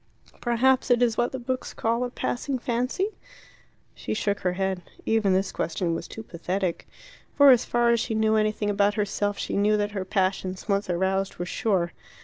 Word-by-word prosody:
"Perhaps 255 +2 +2
it 245 -1 +5
is 230 -2 +2
what 240 - +1
the 265 - -4
books 255 +1 -4
call 230 +2 0
'a 250 - -2
passing 260 +2 -2
fancy'?" 250 - -2 0.7
She - - -4
shook 205 -1 0
her 180 -2 0
head. 190 0 -1 0.2
Even 220 -4 +2
this 190 +1 +1
question 170 0 -1
was - - -4
too 225 - -8
pathetic. 180 -1 -3 0.5
For 285 -1 +8
as 245 -2 +4
far 240 0 +2
as 235 - +3
she 225 0 -2
knew 220 0 +2
anything 215 -1 +1
about 205 0 +2
herself, 205 -1 -1
she - - -3
knew 210 +1 +3
that 205 0 -1
her 195 -2 -3
passions, 185 -1 -1
once 200 -2 0
aroused, 190 +2 0
were 175 - -3
sure. 185 -4 0
210 Hz, 185 wpm, -26 LUFS, 190-240 Hz, 0.7 s, For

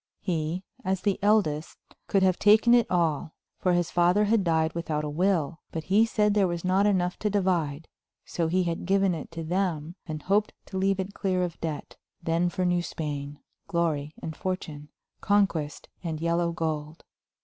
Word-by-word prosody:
He, 170 0 -2 0.2
as 190 -1 -1
the 200 -2 0
eldest, 195 -8 +1 0.3
could 195 -2 +2
have 185 -1 +3
taken 220 +3 +6
it 240 -2 +4
all, 165 -3 0 0.2
for 180 - +2
his 175 -1 +1
father 175 +4 +3
had 215 -1 +2
died 160 -2 +1
without 160 -3 -2
a 150 - -2
will, 170 -2 +1
but 160 - -4
he 205 +6 +4
said 210 -2 +2
there 200 -2 +3
was 175 0 -3
not 190 +3 +3
enough 180 -3 +1
to 210 - 0
divide, 170 -7 0 0.4
so 165 -2 -1
he 185 +3 +2
had 170 0 -3
given 195 -1 +3
it 160 - -6
to 165 0 -5
them 170 -2 -1
and 155 -2 -5
hoped 205 +3 +1
to 190 - -6
leave 195 0 +1
it 190 +1 -3
clear 185 -3 0
of 175 -2 -5
debt; 155 -3 -5 0.2
then 170 +1 +1
for 185 +1 -2
New 175 0 +2
Spain, 145 -3 -5 0.3
glory 160 -5 -1
and 160 - -4
fortune, 155 -6 -5 0.3
conquest 190 -8 +1 0.2
and 160 -3 -3
yellow 170 +1 +1
gold. 155 -2 -3
175 Hz, 180 wpm, -27 LUFS, 160-190 Hz, 0.4 s, taken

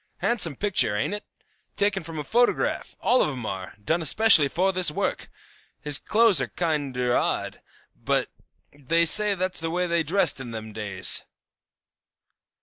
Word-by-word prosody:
Handsome 190 - +1
picture, 185 - +1
ain't 105 - -2
it? 210 - -4 0.5
Taken 200 -1 -1
from 165 -1 -10
a 150 - -4
photograph; 240 +10 -1
all 255 - +2
of - - 0
'em 125 -5 -7
are; 95 -2 -7
done 165 +7 0
especially 165 -1 +5
for 185 +6 -1
this 185 -2 +4
work. 150 - -4 0.5
His 150 -1 +2
clothes 225 -3 +3
are - - -2
kinder 140 -7 -2
odd, - - -2 0.3
but - - -2 0.4
they 160 +4 0
say 210 +4 +3
that's 185 0 -3
the 165 0 -4
way 180 +2 -2
they 170 -1 0
dressed 170 -1 +1
in 130 -3 -8
them 110 -1 -8
days. 100 -4 +3
165 Hz, 155 wpm, -24 LUFS, 135-195 Hz, 0.5 s, especially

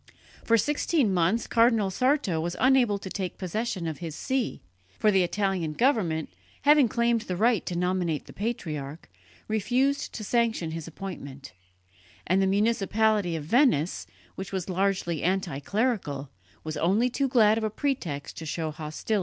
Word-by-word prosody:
For 230 - +4
sixteen 290 - +1
months 180 +6 +2
Cardinal 230 -4 +3
Sarto 255 - +1
was 170 +2 -3
unable 250 -5 +4
to 195 - -9
take 190 -3 -4
possession 190 0 -3
of 160 -2 -4
his 165 -3 -6
see; 260 +4 -2 0.3
for 215 - +3
the 190 -2 +4
Italian 185 -3 -1
government, 175 - +1 0.3
having 290 -2 +6
claimed 235 +1 +1
the 185 -4 -4
right 225 0 +3
to 175 - -2
nominate 180 -3 -1
the - - -13
patriarch, 155 -9 -4 0.4
refused 245 +6 0
to 215 - -5
sanction 225 -7 0
his 165 -1 -6
appointment; 140 - -8 0.7
and 185 +3 +2
the 190 - +3
municipality 210 -2 +2
of 160 - -4
Venice, 225 - +2 0.3
which 190 - -7
was 190 -1 -3
largely 185 -4 0
anti 180 -5 -1
clerical, 165 - -1 0.3
was 155 0 -4
only 200 +8 +2
too 270 +2 0
glad 225 -4 +4
of - - -5
a 215 - +1
pretext 205 - -3
to 160 - -7
show 160 0 -2
hostility 155 - -16
to 155 0 -7
the 220 - +3
Church. - - +1
195 Hz, 165 wpm, -27 LUFS, 165-230 Hz, 0.7 s, having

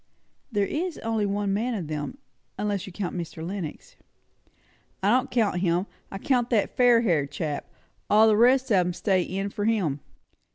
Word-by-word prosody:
"There 205 -3 +1
is 335 - -3
only 225 -2 0
one 200 0 -1
man 230 +4 -1
of 185 -6 -3
them; 150 - -4 0.4
unless 205 -3 -2
you - - -8
count 185 0 -4
Mr. 165 -2 -5
Lenox." 180 -4 -6 1.1
"I 200 - +4
don't 255 +3 +2
count 215 -7 +1
him. 175 0 +1 0.2
I 195 - -6
count 245 +2 +1
that 220 -4 +1
fair 245 -2 +5
haired 160 -11 +1
chap. 145 0 -4 0.4
All 215 +2 +6
the 215 - +5
rest 255 +3 +4
of 200 - +5
'em 180 -1 +2
are - - -3
stay 190 0 +1
in' 195 +3 -3
for 205 -1 -3
him." 190 -11 +1
205 Hz, 180 wpm, -26 LUFS, 180-230 Hz, 1.1 s, All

